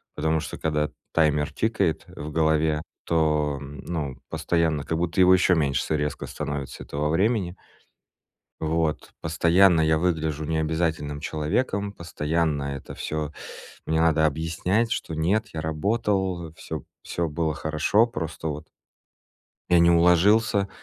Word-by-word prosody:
Потому 80 Hz, +1 st, +1 dB
что, -, -, -6 dB
когда 75 Hz, -1 st, 0 dB, 0.2 s
таймер 75 Hz, -1 st, +2 dB
тикает 100 Hz, -6 st, 0 dB
в 75 Hz, +1 st, -8 dB
голове, 80 Hz, -1 st, +2 dB, 0.2 s
то, 75 Hz, -3 st, +1 dB
ну, 70 Hz, 0 st, -5 dB
постоянно 80 Hz, -2 st, 0 dB
как 80 Hz, -, -2 dB
будто 85 Hz, +2 st, -1 dB
его 90 Hz, 0 st, +7 dB
еще 90 Hz, 0 st, +4 dB
меньше 70 Hz, -4 st, +1 dB
с -, -, -7 dB
резко 75 Hz, 0 st, -2 dB
становится, 70 Hz, -2 st, -5 dB
этого 75 Hz, +1 st, -2 dB
времени. 95 Hz, +1 st, +1 dB, 1.0 s
Вот, 80 Hz, -1 st, -1 dB
постоянно 85 Hz, +2 st, +4 dB
я 80 Hz, 0 st, +3 dB
выгляжу 80 Hz, -3 st, -1 dB
необязательным 80 Hz, -2 st, -1 dB
человеком, 100 Hz, +7 st, -1 dB
постоянно 75 Hz, -4 st, -1 dB
это 70 Hz, -, -8 dB
всё 75 Hz, -1 st, -3 dB, 0.5 s
мне 80 Hz, 0 st, +1 dB
надо 80 Hz, -1 st, +3 dB
объяснять, 85 Hz, +9 st, 0 dB
что 85 Hz, -8 st, -3 dB
нет, 100 Hz, +8 st, +1 dB
я 80 Hz, -, -4 dB
работал, 90 Hz, 0 st, -1 dB
всё -, -, -6 dB, 0.2 s
всё 85 Hz, -1 st, -2 dB
было 80 Hz, +1 st, -1 dB
хорошо, 80 Hz, +9 st, +2 dB
просто 80 Hz, -5 st, -5 dB
вот 75 Hz, +1 st, -5 dB, 1.0 s
я 90 Hz, -, +5 dB
не 85 Hz, 0 st, +6 dB
уложился. 100 Hz, +5 st, +4 dB
80 Hz, 130 wpm, -25 LUFS, 75-85 Hz, 1.0 s, его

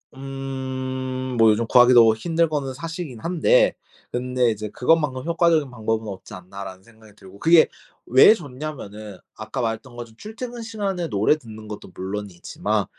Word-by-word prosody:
음. 130 Hz, -1 st, -5 dB
뭐 115 Hz, -1 st, +6 dB
요즘 110 Hz, +2 st, 0 dB
구하기도 120 Hz, -2 st, +7 dB
힘든 165 Hz, +7 st, +1 dB
거는 140 Hz, -3 st, -2 dB
사실이긴 165 Hz, -3 st, -6 dB
한데 340 Hz, -, +3 dB, 0.4 s
근데 125 Hz, -1 st, 0 dB
이제 110 Hz, 0 st, -5 dB
'그것만큼 135 Hz, -2 st, +1 dB
효과적인 170 Hz, -3 st, +2 dB
방법은 110 Hz, -2 st, -2 dB
없지 95 Hz, -2 st, -9 dB
않나.'라는 95 Hz, +1 st, -9 dB
생각이 110 Hz, 0 st, -20 dB
들고. 95 Hz, 0 st, -14 dB
그게 165 Hz, +4 st, +6 dB, 0.4 s
왜 130 Hz, -, +7 dB
좋냐면은 125 Hz, -, -8 dB, 0.2 s
아까 110 Hz, +4 st, -6 dB
말했던 115 Hz, +2 st, -4 dB
것처럼 115 Hz, -2 st, -9 dB
출퇴근 235 Hz, -, -7 dB
시간에 200 Hz, -6 st, -3 dB
노래 105 Hz, +9 st, +2 dB
듣는 110 Hz, -5 st, -11 dB
것도 105 Hz, -3 st, -9 dB
물론이지만 95 Hz, -1 st, -3 dB
125 Hz, 350 characters per minute, -23 LUFS, 110-155 Hz, 0.4 s, 구하기도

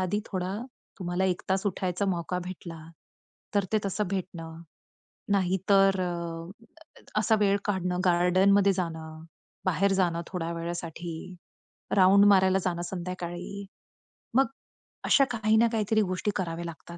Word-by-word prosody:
आधी 185 Hz, +3 st, 0 dB
थोडा 185 Hz, 0 st, -3 dB, 0.4 s
तुम्हाला 180 Hz, 0 st, -1 dB
1 180 Hz, -2 st, 0 dB
तास 190 Hz, +2 st, +1 dB
उठायचा 185 Hz, 0 st, -1 dB
मौका 180 Hz, -1 st, -1 dB
भेटला 175 Hz, -2 st, -8 dB, 0.7 s
तर 200 Hz, -1 st, +3 dB
ते 215 Hz, -, +4 dB
तसं 195 Hz, +1 st, -1 dB
भेटणं. 165 Hz, -4 st, -5 dB, 0.7 s
नाहीतर 195 Hz, 0 st, +3 dB
अ, 175 Hz, -, -6 dB, 0.4 s
असा 220 Hz, +1 st, +3 dB
वेळ 200 Hz, -1 st, +3 dB
काढणं 180 Hz, -3 st, -1 dB
गार्डनमध्ये 185 Hz, +3 st, +4 dB
जाणं, 160 Hz, -3 st, -5 dB, 0.4 s
बाहेर 195 Hz, +2 st, +2 dB
जाणं, 175 Hz, -3 st, +1 dB
थोड्या 170 Hz, -3 st, -3 dB
वेळासाठी, 170 Hz, 0 st, -5 dB, 0.8 s
राउंड 195 Hz, +1 st, +6 dB
मारायला 190 Hz, -2 st, +5 dB
जाणं 175 Hz, -2 st, -1 dB
संध्याकाळी. 180 Hz, +2 st, -5 dB, 0.7 s
मग 270 Hz, -, +6 dB, 0.6 s
अशा 275 Hz, -, +5 dB
काही 220 Hz, -2 st, +2 dB
ना 230 Hz, +1 st, +5 dB
काहीतरी 220 Hz, -1 st, +1 dB
गोष्टी 185 Hz, +1 st, -1 dB
कराव्या 170 Hz, -2 st, -3 dB
लागतात 170 Hz, +1 st, -9 dB
185 Hz, 125 wpm, -28 LUFS, 175-200 Hz, 0.8 s, राउंड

